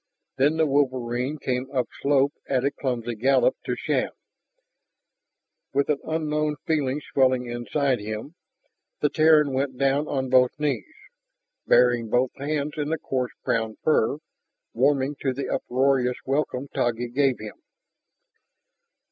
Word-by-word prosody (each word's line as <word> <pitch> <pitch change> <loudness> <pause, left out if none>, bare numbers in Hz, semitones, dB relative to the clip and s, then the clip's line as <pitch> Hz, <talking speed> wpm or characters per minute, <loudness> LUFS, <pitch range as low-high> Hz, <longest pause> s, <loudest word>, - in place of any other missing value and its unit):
Then 145 +4 +3
the 160 - +3
wolverine 130 -1 0
came 130 -1 -2
upslope 140 +2 +1 0.2
at 130 -1 +1
a 140 - +2
clumsy 120 -4 -3
gallop 135 - +3
to - - -1
Shann. - - -1 1.7
With 140 +1 +2
an 145 -2 +1
unknown 150 -1 -1
feeling 145 -3 0
swelling 130 -2 +3
inside 125 +3 -1
him, 110 +7 -6 0.7
the 150 - +2
Terran 155 -3 +4
went 130 -1 -1
down 140 +2 +1
on 130 -1 -1
both 130 +2 +4
knees, 150 - -2 0.7
burying 120 -2 +4
both 125 +2 +2
hands 150 +1 -2
in 150 0 -1
the 160 - 0
coarse 130 -4 -3
brown 110 -1 0
fur, 145 -3 +2 0.6
warming 135 +2 +1
to 135 -2 0
the 140 +2 -4
uproarious 130 -1 +1
welcome 135 -1 -1
Taggi 120 0 -1
gave 135 +1 +2
him. 335 - -10
135 Hz, 130 wpm, -25 LUFS, 125-145 Hz, 1.7 s, Terran